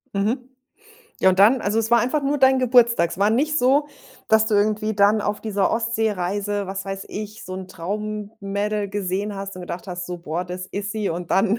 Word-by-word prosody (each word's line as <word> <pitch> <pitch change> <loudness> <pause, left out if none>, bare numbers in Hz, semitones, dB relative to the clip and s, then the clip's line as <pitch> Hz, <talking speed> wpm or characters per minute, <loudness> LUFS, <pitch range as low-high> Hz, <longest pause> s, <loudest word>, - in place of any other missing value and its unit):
Mhm. 215 +6 +1 0.8
Ja, 190 - +5
und 185 - -1
dann 220 +6 +6
also, 210 +2 0
es 225 0 -1
war 235 0 +6
einfach 255 +5 0
nur 280 +1 +1
dein 265 0 +5
Geburtstag. 235 -8 +4
Es - - -7
war 200 +2 +3
nicht 300 +7 +1
so, 275 +4 +3 0.4
dass 220 0 +4
du 220 - +1
irgendwie 215 +1 +1
dann 205 +1 +4
auf 205 0 -2
dieser 205 -3 0
Ostseereise, 205 -3 -1
was 195 0 -5
weiß 195 0 -5
ich, 215 +1 -7
so 185 - -6
'n 185 0 -7
Traum-Mädel 205 +2 -3
gesehen 200 +1 -2
hast 195 0 -6
und 180 - -7
gedacht 175 +1 -6
hast, 175 -1 -5
so: 180 -1 -5
„Boah, 170 +1 -3
das 180 +1 -6
ist 205 +2 -4
sie“, 215 -2 -2
und 170 +1 -4
dann 200 +3 +3
205 Hz, 205 wpm, -22 LUFS, 195-225 Hz, 0.8 s, dann